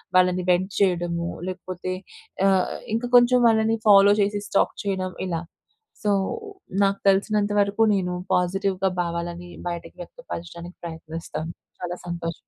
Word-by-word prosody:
వాళ్ళని 180 0 +4
వెంట్ 185 +2 +2
చేయడము. 175 -3 +1 0.2
లేకపోతే 185 0 -5 0.5
ఆహ్, 190 -2 +2 0.2
ఇంక 230 - -1
కొంచెం 245 +1 +5
వాళ్ళని 225 0 +3
ఫాలో 200 0 +8
చేసి 205 +1 0
స్టాక్ - - +1
చేయడం 185 -2 -2
ఇలా. 165 -2 -2 0.6
సో 210 - +2 0.7
నాకు 195 0 +1
తెలిసినంత 205 +1 +2
వరకు 200 +2 0
నేను 180 -2 -1 0.2
పాజిటివ్‌గా 190 +1 +1
భావాలను 170 0 -4 0.2
బయటకి 170 -1 -6
వ్యక్తపరచడానికి 175 - -8
ప్రయత్నిస్తాను 160 -1 -6 0.3
చాలా 175 0 -4
సంతోషం. 170 -1 -3
185 Hz, 120 wpm, -24 LUFS, 175-200 Hz, 0.7 s, ఫాలో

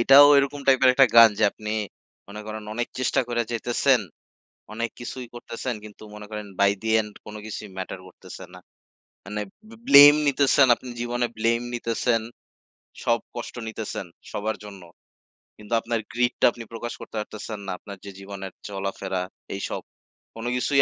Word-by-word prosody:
এটাও 135 +4 +9
এরকম 140 +1 0
টাইপের 130 -1 +5
একটা 135 0 +7
গান 115 -1 +10
যে 110 - +4
আপনি 105 0 -7 0.6
মনে 105 +1 -8
করেন 110 0 -6
অনেক 120 0 -2
চেষ্টা 130 -1 +2
করে 120 -1 0
যাইতেছেন, 120 +2 +2 0.7
অনেক 115 +1 -2
কিছুই 125 +1 -6
করতেছেন 120 0 -5
কিন্তু 105 0 -12
মনে 105 0 -9
করেন 105 -1 -5
by 100 0 +5
the 110 0 -1
end 105 -1 -10
কোনো 105 0 -8
কিছুই 110 -1 -7
matter 95 0 -5
করতেছে - - -12
না। - - -11 0.7
মানে 105 +1 -4 0.3
বে 230 - -13
blame 145 +1 +10
নিতেছেন, 140 0 +4
আপনি 125 - -12
জীবনে 120 0 0
blame 115 +2 +1
নিতেছেন, 115 0 0 0.8
সব 115 -1 +2 0.2
কষ্ট 120 - -6
নিতেছেন 110 -3 -5 0.3
সবার 110 +1 -2
জন্য। 100 -2 -10 0.8
কিন্তু 105 +2 -8
আপনার 115 -1 -1
greed 120 +1 +1
টা - - +6
আপনি 120 - -9
প্রকাশ 120 +1 -5
করতে - - -10
পারতেছেন 105 0 -6
না, - - -2
আপনার 100 -2 -10
যে 100 - -7
জীবনের 95 -1 -8
চলাফেরা 95 -1 -3 0.3
এইসব, 100 - -4 0.5
কোনো 115 +2 -4
কিছুই 135 +2 +3
115 Hz, 160 wpm, -25 LUFS, 105-120 Hz, 0.8 s, গান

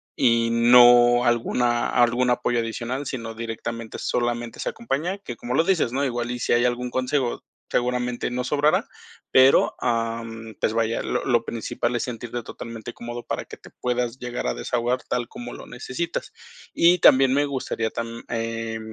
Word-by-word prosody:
y 115 -1 +3
no 120 +1 +6
alguna 120 0 +1
algún 125 +1 +3
apoyo 120 0 +1
adicional, 120 +4 -3
sino 115 -4 -5
directamente 115 0 -5
solamente 120 -1 -2
esa - - -3
compañía, 190 -3 -3
que 120 -11 -7
como 120 +2 -5
lo 160 - +4
dices, 165 -9 +1
¿no? 135 +2 -1
Igual 120 -2 -2
y 125 - -4
si - - -1
hay 120 +1 +3
algún 125 0 -1
consejo, 130 0 -1 0.3
seguramente 125 0 -1
no 125 0 -2
sobrará, 145 +3 +2 0.4
pero, 130 +1 +5
am, 115 -1 -3
pues, 110 - 0
vaya, 115 0 0
lo - - -2
lo 120 -3 +1
principal 120 +1 -2
es 120 - 0
sentirte 120 0 -5
totalmente 115 -1 -8
cómodo 120 0 -7
para - - -4
que - - -11
te - - -15
puedas 125 0 -2
llegar 120 - -4
a - - -1
desahogar 120 - -1
tal 120 -1 -2
como 120 +1 -8
lo - - -10
necesitas. 130 +7 -5 0.4
Y 175 +2 +5
también 135 -5 +6
me 145 - +3
gustaría 130 -5 -3
tam 115 0 -5
eh, 115 -1 -3
120 Hz, 170 wpm, -24 LUFS, 115-125 Hz, 0.4 s, no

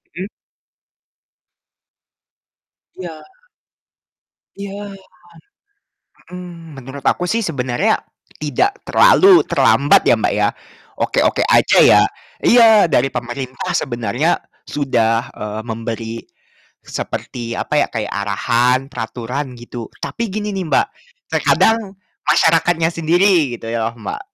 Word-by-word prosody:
Mhm. 185 +2 -4 2.7
Iya. 170 -4 -8 1.4
Iya. 200 +1 -7 1.4
Mhm. 170 -5 -10
Menurut 135 +2 -10
aku 180 - +1
sih 230 +4 0
sebenarnya 130 -7 0 0.4
tidak 375 - -1
terlalu 390 -7 +6
terlambat - - +3
ya, - - +6
Mbak, - - -1
ya, - - +2 0.5
oke-oke - - +1
aja - - +4
ya - - +6 0.4
iya 220 -7 +6
dari 135 -1 +3
pemerintah 125 +1 -5
sebenarnya 120 +5 0 0.3
sudah, 120 -4 0
eee, 105 +1 -6
memberi 115 0 -5 0.7
seperti, 115 -2 -5
apa 150 - 0
ya, - - +2
kayak 110 -3 -4
arahan, 115 +5 +1
peraturan 125 +3 -5
gitu, 120 -1 -8 0.2
tapi 230 -1 -3
gini 210 +1 -3
nih, 190 -2 -3
Mbak, - - +2 0.4
terkadang 220 -3 +2 0.3
masyarakatnya 165 0 +3
sendiri 165 -4 +2
gitu - - -9
ya, 115 -1 -1
Mbak, 115 - -6
145 Hz, 100 wpm, -18 LUFS, 120-180 Hz, 2.7 s, terlalu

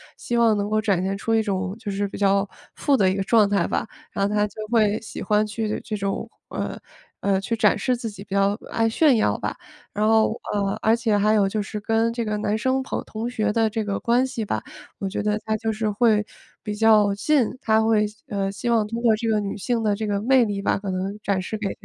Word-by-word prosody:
希 240 - -3
望 230 -2 +4
能 205 +1 -1
够 215 0 +2
展 195 -4 +1
现 195 +1 -1
出 225 +2 0
一 220 - +3
种 195 -1 -2
就 210 -3 -5
是 200 +1 -1
比 - - -8
较 200 0 +2 0.3
富 285 -2 +2
的 190 -6 +3
一 190 - 0
个 195 - -1
状 215 -1 +4
态 200 -4 +1
吧。 - - -1 0.3
然 200 - 0
后 205 - -1
她 210 0 +2
就 215 +1 -7
会 215 -2 +3
喜 225 - -8
欢 210 0 +2
去 215 +1 -3
的 210 - -2
这 215 -2 -4
种， 195 +3 -3 0.2
呃， - - -4 0.4
呃， 195 -1 +1
去 230 +4 -2
展 210 -2 +3
示 255 -1 0
自 235 -2 -5
己， 200 -1 -10
比 200 - -9
较 200 +1 +2
爱 225 0 +1
炫 280 +2 +4
耀 - - +1
吧。 - - -4 0.4
然 210 +1 0
后， 220 0 +3
呃， 200 -1 0
而 220 +1 +4
且 225 -3 +1
还 210 +1 +3
有 205 -2 +3
就 210 +2 -1
是 210 +1 -5
跟 225 +2 +1
这 235 -1 -3
个 210 - -1
男 210 +1 0
生 260 +3 +1
朋 265 - -3
同 225 +2 -4
学 215 -3 -1
的 225 -1 +2
这 220 0 -2
个 200 -1 -2
关 245 +2 +2
系 235 -4 -4
吧， 110 - -2 0.4
我 195 - -3
觉 190 - -3
得 210 0 0
她 220 0 0
就 225 +1 -2
是 215 0 -1
会 210 -1 +3 0.4
比 210 - -3
较 210 -1 +4
信 255 +4 +2
她 220 0 +3
会 215 -1 +3 0.2
呃， 195 -1 -2
希 235 +4 -4
望 225 -2 +3
通 230 +2 -4
过 225 -2 +5
这 230 - -3
个 215 -1 +2
女 200 -1 -3
性 230 +2 -1
的 205 -1 +2
这 215 0 -3
个 200 -1 0
魅 255 +3 +4
力 200 -1 -3
吧， - - +1
可 200 -1 -5
能 190 +2 -2
展 200 -3 0
示 190 +4 -4
给 200 -2 -2
215 Hz, 270 characters per minute, -23 LUFS, 200-225 Hz, 0.4 s, 过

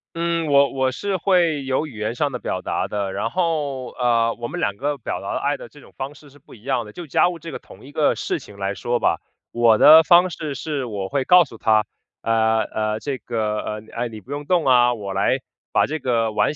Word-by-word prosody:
嗯， 170 -1 -1
我 140 -1 +4
我 130 -1 +1
是 195 +8 -2
会 170 -6 +2
有 130 +4 0
语 140 - -11
言 110 +2 -2
上 145 +2 0
的 125 - -4
表 95 -5 -4
达 - - -1
的， 100 -2 -3
然 105 +4 -2
后， 150 -8 -1
呃， 115 -2 +1
我 120 - -3
们 - - -5
两 100 - 0
个 145 +6 -2
表 125 - -5
达 - - -4
的 - - -1
爱 - - 0
的 - - -10
这 - - -17
种 - - -18
方 135 +2 -6
式 145 -1 -17
是 145 - -19
不 135 - -16
一 105 - -19
样 130 -2 0
的。 105 - -11
就 175 +6 -8
家 175 +4 +3
务 175 - -6
这 165 +1 -9
个 - - -6
同 - - -16
一 140 - -12
个 150 0 +2
事 - - -2
情 100 - -14
来 100 0 -2
说 120 +4 -1
吧， - - +1 0.3
我 115 -2 +4
的 155 +6 +9
方 175 +2 +5
式 155 -4 -5
是 145 -5 -3
我 100 -4 -4
会 140 -2 -1
告 180 -1 +7
诉 115 -6 -13
她： 110 -1 +3 0.4
“呃， 110 0 +2
呃， 110 0 -2
这 135 -1 -4
个， 110 -3 -2
呃， 105 0 -5
哎， 120 - -2
你 110 -2 -9
不 120 +7 -14
用 145 0 -5
动 175 -2 +2
啊， 125 -1 +4
我 100 -3 -6
来， 100 +7 +1 0.3
把 - - +3
这 155 +1 -4
个 115 -4 0
碗 105 +8 +1
130 Hz, 270 characters per minute, -22 LUFS, 110-150 Hz, 0.4 s, 的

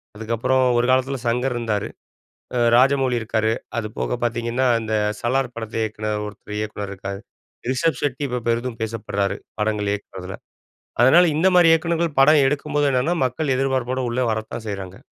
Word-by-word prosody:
அதுக்கப்புறம், 115 +4 0
ஒரு 120 - +2
காலத்துல 130 +1 +1
சங்கர் 125 +2 0
இருந்தாரு. 110 -4 -2 0.7
அ - - +2 0.2
ராஜமௌலி 130 -1 +3
இருக்காரு, 110 0 0 0.3
அது 105 - -4
போக 125 - -1
பாத்தீங்கன்னா, 120 +2 0
இந்த 110 0 -2 0.3
சலார் 130 +1 0
படத்த 115 -1 -6
இயக்குன 110 0 -3
ஒருத்தர் 105 0 -8
இயக்குனர் 105 -2 -4
இருக்கார். 100 0 -6 0.5
ரிஷப் 160 +5 0
ஷெட்டி 145 -1 -1
இப்ப 125 0 -2
பெரிதும் 115 0 -1
பேசப்படுறாரு, 105 -3 -2 0.2
படங்கள் 105 -1 0
இயக்குறதுல. 95 -2 -7 0.7
அதனால 160 +9 +7
இந்த 165 +5 +3
மாரி 175 -2 +7
இயக்குனர்கள் 165 -2 0
படம் 150 +1 +6
எடுக்கும்போது 145 +1 0
என்னன்னா, 135 +7 +1
மக்கள் 130 +3 -1
எதிர்ப்பார்ப்போடு 130 -1 0
உள்ள 125 +2 -1
வரத்தான் 110 +1 -5
செய்றாங்க. 95 -2 -6
120 Hz, 145 wpm, -22 LUFS, 110-135 Hz, 0.7 s, அதனால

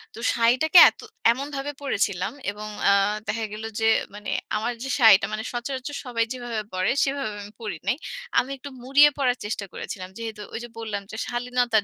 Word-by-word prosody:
তো - - -9
শাড়িটাকে 255 +9 +5
এতো - - -13 0.3
এমনভাবে 280 +2 -4
পরেছিলাম 200 -7 0 0.2
এবং 210 +1 -8 0.2
আ - - +6 0.3
দেখা 225 +1 -1
গেল 215 +1 -7 0.2
যে - - +2 0.3
মানে 210 0 -7 0.3
আমার 230 +3 -1
যে 270 - -4
শাড়িটা 200 -4 +7
মানে 215 - -3
সচরাচর 260 +4 -4
সবাই 230 -2 0
যেভাবে 240 -3 -4
পরে 185 0 +1
সেভাবে 275 -5 -1
আমি 205 +1 -12
পড়ি 215 - -4
নাই। 255 - +3 0.4
আমি 260 - -2
একটু 280 +2 -9
মুড়িয়ে 285 +3 +6
পড়ার 255 -3 +1
চেষ্টা 210 -1 -3
করেছিলাম। 185 -1 -6
যেহেতু 220 -2 -6
ওই - - -3
যে 240 - -8
বললাম 215 -3 -3
যে, - - -7
শালীনতার 245 -3 +1
235 Hz, 180 wpm, -25 LUFS, 215-260 Hz, 0.4 s, শাড়িটা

